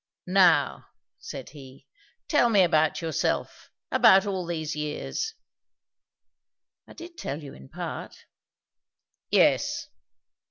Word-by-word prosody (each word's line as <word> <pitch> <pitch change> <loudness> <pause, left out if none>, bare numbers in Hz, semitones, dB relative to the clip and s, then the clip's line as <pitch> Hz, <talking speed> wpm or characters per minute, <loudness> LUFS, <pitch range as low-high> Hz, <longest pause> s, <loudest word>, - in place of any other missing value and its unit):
"Now," 180 -6 +3 0.3
said - - -8
he, 135 -3 -14 0.4
"tell 290 -6 +3
me 205 -4 +5
about 160 -1 +2
yourself 160 -3 -2 0.2
about 190 +1 +6
all 190 -3 -3
these 160 -3 -3
years." 150 - -4 1.5
"I - - -13
did 340 0 -11
tell 145 +3 -5
you, 140 - -9
in 65 0 -14
part." - - -7 1.0
"Yes. - - +2
165 Hz, 105 wpm, -26 LUFS, 150-195 Hz, 1.5 s, about